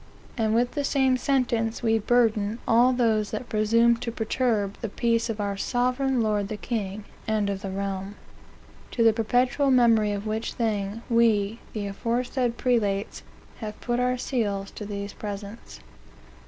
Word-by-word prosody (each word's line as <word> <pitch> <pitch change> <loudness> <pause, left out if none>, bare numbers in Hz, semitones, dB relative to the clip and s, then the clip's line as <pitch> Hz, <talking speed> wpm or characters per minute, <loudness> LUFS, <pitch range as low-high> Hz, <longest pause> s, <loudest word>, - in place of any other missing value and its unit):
And 220 -2 +1
with 245 +1 +2
the 290 - -2
same 265 -2 +2
sentence 245 -4 0
we 225 -1 +3
burden 220 -2 +2
all 240 +3 +5
those 225 -4 +1
that 220 +2 -5
presume 230 +2 +3
to 235 0 -4
perturb 220 -3 -1
the 225 - -3
peace 230 +2 0
of 220 -1 -3
our 200 -1 -1
sovereign 250 +4 0
Lord 210 -2 0
the 215 - -5
King, 210 -2 -4 0.2
and 215 -2 +1
of 195 -1 -4
the 195 - -4
Realm. 195 +1 -4 0.8
To 230 - +2
the 225 -1 +6
perpetual 245 +5 +1
memory 230 -5 +4
of 205 +1 -4
which 220 +1 -2
thing, 215 -1 -2
We, 230 -2 +2
the 210 -2 -3
aforesaid 235 +4 -1
Prelates, 210 -5 0 0.4
have 215 -2 -6
put 240 0 -1
our 250 0 +1
seals 205 -6 -2
to 210 - -7
these 200 -1 -5
presents." 205 +1 -8
225 Hz, 155 wpm, -26 LUFS, 205-245 Hz, 0.8 s, the